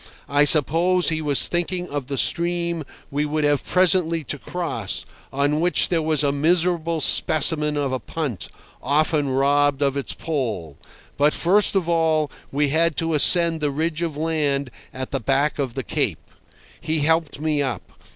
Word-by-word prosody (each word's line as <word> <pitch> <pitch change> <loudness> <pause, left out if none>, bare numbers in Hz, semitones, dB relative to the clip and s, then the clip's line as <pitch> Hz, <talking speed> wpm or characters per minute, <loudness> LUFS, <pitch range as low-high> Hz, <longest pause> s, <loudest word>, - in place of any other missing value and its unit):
I 145 +2 +2
suppose 165 +5 +3
he 160 -1 -2
was 145 -3 +3
thinking 175 +1 -3
of 145 -3 -5
the 140 -1 -4
stream 170 0 +1 0.3
we 145 +1 -1
would 150 +1 -2
have 145 -1 +1
presently 175 -3 +2
to 140 +2 -6
cross, 160 - -3 0.3
on 145 +2 0
which 175 +2 +2
there 170 -2 0
was 155 -1 0
a 140 - +1
miserable 165 +2 0
specimen 150 -1 +3
of 140 -2 -2
a 130 - -2
punt, 145 - -5 0.3
often 150 +1 0
robbed 140 +1 +1
of 140 -1 0
its 140 - -3
pole. 110 - -5 0.4
But 145 +1 +2
first 200 +4 +3
of 185 -4 0
all 160 -3 0 0.2
we 145 +1 0
had 165 +2 +1
to 165 0 -1
ascend 165 +1 +4
the 150 - 0
ridge 160 +3 -3
of 165 -4 -3
land 145 -4 -2 0.2
at 130 0 -7
the 135 - -2
back 135 +6 -1
of 130 -4 -3
the - - -4
Cape. - - -3 0.5
He 160 -2 -2
helped 160 -1 0
me 155 -1 -1
up. 130 -7 -5
150 Hz, 170 wpm, -21 LUFS, 140-165 Hz, 0.5 s, ascend